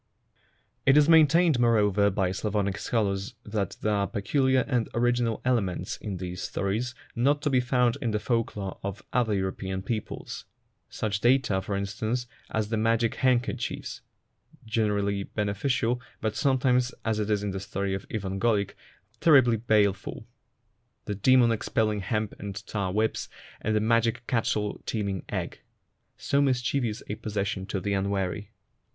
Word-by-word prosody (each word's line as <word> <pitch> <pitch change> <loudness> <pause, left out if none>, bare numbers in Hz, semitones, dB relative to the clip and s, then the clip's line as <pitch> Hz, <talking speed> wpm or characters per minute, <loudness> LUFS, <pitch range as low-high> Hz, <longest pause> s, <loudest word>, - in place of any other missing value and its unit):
It 135 +2 +5
is 150 -1 +6
maintained, 160 -2 +5
moreover, 105 -4 +4
by 95 -2 0
Slavonic 100 0 -1
scholars 100 -1 -1
that 105 -2 -2
there 105 - +1
are 100 -1 +1
pecuUar 130 +5 +1
and 125 -5 0
original 120 -1 +1
elements 110 -8 0
in 100 -3 -5
these 90 0 -5
stories 110 +6 -2 0.2
not 140 +5 +3
to 145 - +1
be 130 - +4
found 125 +1 +1
in 120 - 0
the 105 - 0
folk 115 +1 -1
lore 95 -2 -5
of 100 0 -5
other 115 -4 +2
European 95 0 -3
peoples; 110 -1 -5 0.4
such 105 -2 -2
data, 120 -4 +3
for 100 +1 -3
instance, 110 +5 -2 0.2
as 110 -1 -1
the 115 - 0
magic 115 +1 +2
handkerchiefs 125 -2 -1 0.6
(generally 105 -3 0
beneficial, 115 +5 -1 0.2
but 110 -1 -2
some 135 +3 +2
times, 125 -1 +2
as 110 -1 0
in 105 -1 0
the 95 - -4
story 100 0 -3
of 95 - -5
Ivan 95 -3 -3
Golik, 105 -3 +1 0.5
terribly 130 -8 +6
baleful), 105 -3 +1 0.8
the 105 - -2
demon 120 +4 +4
expelling 110 -1 0
hemp 105 +2 -2
and 100 -1 -6
tar 100 -3 -2
whips, 110 +3 0 0.3
and 110 0 0
the - - +4
magic 115 +1 +1
cattle 110 -4 -1
teeming 100 -4 -2
egg, - - -4 0.6
so 140 - +1
mischievous 125 -4 0
a - - -3
possession 105 -3 -3
to 100 - -2
the 100 +2 -2
unwary. 100 0 -1
110 Hz, 145 wpm, -27 LUFS, 100-120 Hz, 0.8 s, is